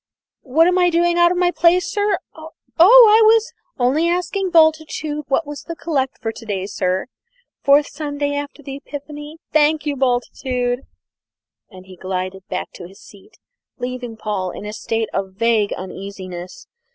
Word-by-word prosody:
What 300 +5 +3
am 360 +1 +3
I 355 -1 +4
doing 345 0 +2
out 345 0 +5
of 360 - -1
my 355 -1 +2
place, 350 +1 +3
sir? 410 -2 +1 0.2
Oh, 315 0 -11 0.3
I 440 +4 +8
was 445 +1 +4 0.2
only 275 +7 +2
asking 360 +2 -1
Bultitude 315 -2 +2
what 295 +4 0
was 295 0 -7
the 335 - -7
collect 285 -5 -2
for 225 - -3
to 225 - -12
day, 200 -4 -3
sir. 185 -2 -1 0.6
Fourth 285 +1 +5
Sunday 285 -1 -3
after 285 +1 -5
the 275 0 -6
Epiphany? 295 +2 -9 0.2
thank 305 0 +3
you, 290 -1 -1
Bultitude." 250 0 -1 0.8
And 185 0 -14
he 185 -1 -13
glided 185 +1 -5
back - - -4
to 175 - -10
his 195 +2 -17
seat, 200 -2 -17 0.4
leaving 245 -2 -5
Paul 205 -4 -3
in 200 - -8
a 210 - -6
state 225 0 -2
of 190 -1 -3
vague 225 -1 +1
uneasiness. 185 -1 -8
285 Hz, 165 wpm, -20 LUFS, 215-330 Hz, 0.8 s, I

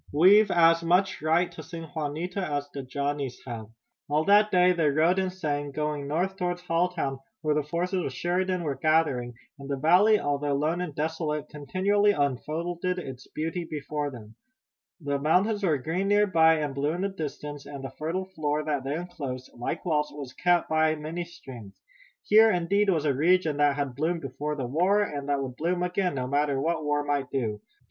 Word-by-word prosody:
We've 195 +8 +6
as 165 -1 +5
much 180 +3 +2
right 165 +3 +2
to 165 - -9
sing 165 +2 -8
Juanita 160 +5 -3
as 145 -5 -2
the 140 - -4
Johnnies 140 0 -3
have." 115 -4 -6 0.4
All 150 +1 +2
that 210 +1 +5
day 180 -1 +4
they 165 -4 +2
rode 160 +6 +3
and 190 -1 0
sang, 145 -6 -3
going 150 -1 -3
north 180 +6 -1
toward 180 -1 -1
Halltown, 170 -5 -1 0.2
where 155 -1 +2
the 150 - +1
forces 175 +5 -2
of - - -3
Sheridan 180 +5 -1
were 145 -3 -1
gathering, 135 -4 +1 0.2
and 140 0 -9
the 140 - -1
valley, 185 +9 +5
although 145 0 -1
lone 155 +5 0
and 165 -5 -5
desolate, 155 0 -2
continually 195 +8 +1
unfolded 165 +5 -2
its 130 -7 -7
beauty 165 +3 -3
before 150 -2 -4
them. 110 -5 -11 0.7
The 140 -3 -2
mountains 195 +8 +2
were 160 -6 +2
green 165 +9 -2
near 205 +1 +4
by 160 -4 +5
and 150 -3 -2
blue 145 +3 -1
in 175 - -3
the 200 - 0
distance, 150 -5 -6
and 140 -2 -8
the 135 - -6
fertile 170 +5 -3
floor 155 -5 -2
that 145 -3 -2
they 140 +2 -2
enclosed, 145 -7 -6
like 120 +8 -4
walls, 150 -3 0
was 140 -3 -8
cut 175 +3 +2
by 155 0 +2
many 160 +3 -5
streams. 125 -11 -12 0.4
Here, 220 +2 +6
indeed, 200 +3 +2
was 160 -5 +1
a 145 - +3
region 160 +1 +2
that 145 -1 +3
had 140 -2 -2
bloomed 160 +5 -1
before 145 +3 -4
the 135 -3 -3
war, 180 +11 +2
and 145 -7 -5
that 140 -1 +1
would 130 -1 -7
bloom 175 +3 0
again, 180 -2 0
no 130 -1 -2
matter 140 +1 +1
what 160 +2 -1
war 145 0 0
might 145 -2 -1
do. 110 -6 -2
155 Hz, 190 wpm, -27 LUFS, 145-180 Hz, 0.7 s, We've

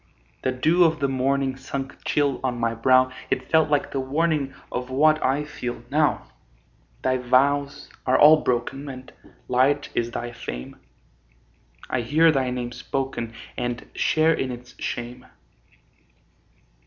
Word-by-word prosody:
The 130 - 0
dew 160 +8 +3
of 160 -2 +2
the 140 - +1
morning 135 0 0
Sunk 135 +1 -6
chill 145 -2 +1
on 125 -2 -1
my 115 0 0
brow 130 +2 +4 0.2
It 130 - -2
felt 160 -1 +4
like 145 -1 +1
the 135 - -2
warning 140 0 0 0.2
Of 125 +1 -4
what 155 +4 +3
I 135 +3 +1
feel 125 -4 -6
now. - - +1 0.8
Thy 130 0 +2
vows 140 +3 +1 0.2
are 130 - +4
all 155 +1 +8
broken, 130 +3 -2
And 130 -1 -10 0.3
light 135 +3 +2
is 120 0 0
thy 120 0 -5
fame; 60 - -7 1.1
I 130 - -1
hear 155 +7 +4
thy 135 -3 0
name 125 -1 -3
spoken, 125 -1 -4 0.2
And 120 -1 -4
share 160 +1 +3
in 130 -4 -2
its 125 0 -10
shame. 120 +1 -5
130 Hz, 140 wpm, -24 LUFS, 125-145 Hz, 1.1 s, all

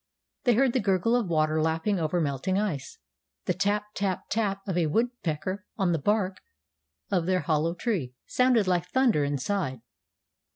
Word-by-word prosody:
They 245 -3 +5
heard 260 +1 +3
the 255 - +2
gurgle 195 +3 +2
of 240 -5 +1
water 155 -1 +1
lapping 165 +5 0
over 165 +2 0
melting 150 +5 -1
ice. 170 -10 -2 0.5
The - - +1
tap 205 +2 +1
tap 195 -2 -1
tap 200 -3 0
of 190 - -1
a 170 -3 +2
woodpecker 190 -2 -1
on 190 -4 +2
the 165 - +1
bark 195 +1 +1 0.7
of 175 -2 +1
their 185 -1 +2
hollow 165 +1 0
tree 170 - -2
sounded 250 -4 +3
like 180 -1 +1
thunder 245 - +3
inside. 140 - -2
185 Hz, 160 wpm, -27 LUFS, 160-210 Hz, 0.7 s, They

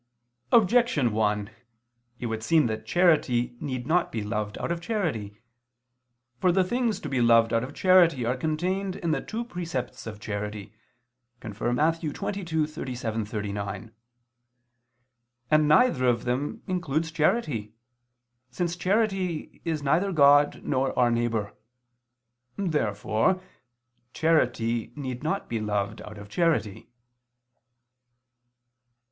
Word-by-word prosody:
Objection 225 - +4
1: 105 0 0 0.7
It - - -4
would 110 -1 -3
seem 155 +5 +3
that 110 -1 -3
charity 135 -8 +2
need 130 -3 -4
not 170 +4 +1
be 110 -2 -3
loved 105 -1 -3
out - - -3
of 170 0 -2
charity. 140 - -3 1.0
For 180 - +3
the 185 +1 +3
things 235 +3 -1
to - - -5
be 135 -3 0
loved 115 -1 +5
out 115 +1 +2
of 135 +3 -7
charity 175 -9 +4
are 125 +2 +1
contained 180 +7 -2
in 170 - -2
the 140 -3 0
two 230 +2 -5
precepts 165 - -5
of 105 -2 -7
charity 105 0 -5 0.7
(Matt. 110 - -6
22:37 150 - -2
39): 105 0 -5 1.6
and 155 0 +5
neither 150 - +4
of 120 -2 +2
them 140 - -2
includes 165 -4 -1
charity, 150 - 0 0.7
since 170 +7 -2
charity 190 -3 -1
is 160 -3 -2
neither 170 +8 +2
God 145 -2 +5
nor 135 -1 -1
our 120 -1 +4
neighbor. 115 -3 -1 1.0
Therefore 150 - 0 0.7
charity 120 -8 +1
need 130 -4 -5
not 160 +6 -2
be 115 - -2
loved 105 -2 -2
out 105 0 -10
of 100 0 -10
charity. 115 - 0
135 Hz, 115 wpm, -26 LUFS, 110-170 Hz, 1.6 s, loved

